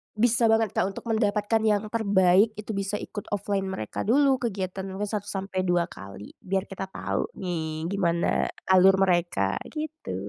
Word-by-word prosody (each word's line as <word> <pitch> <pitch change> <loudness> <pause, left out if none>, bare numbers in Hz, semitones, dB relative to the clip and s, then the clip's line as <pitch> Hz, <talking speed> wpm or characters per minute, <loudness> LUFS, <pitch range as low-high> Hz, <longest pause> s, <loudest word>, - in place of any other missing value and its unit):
Bisa 230 +1 +3
banget, 225 -2 +3
Kak, 185 - +1
untuk - - -8
mendapatkan 215 0 +1
yang 210 0 +1
terbaik, 200 -1 +4
itu 210 +1 -6
bisa 200 0 -2
ikut 210 0 -6
offline 200 -1 -1
mereka 150 - -4
dulu 270 +1 +4
kegiatan 190 -4 -3
mungkin 200 +2 -4
1 205 -2 -3
sampai 190 -1 -3
2 175 -1 +3
kali, 100 +1 -10
biar 190 +1 -1
kita 195 -1 -6
tahu - - -2
nih 160 -3 -3
gimana 170 -4 +1 0.2
alur 190 +1 +7
mereka, 175 - +1
gitu. 315 0 -5
195 Hz, 160 wpm, -26 LUFS, 185-215 Hz, 0.2 s, alur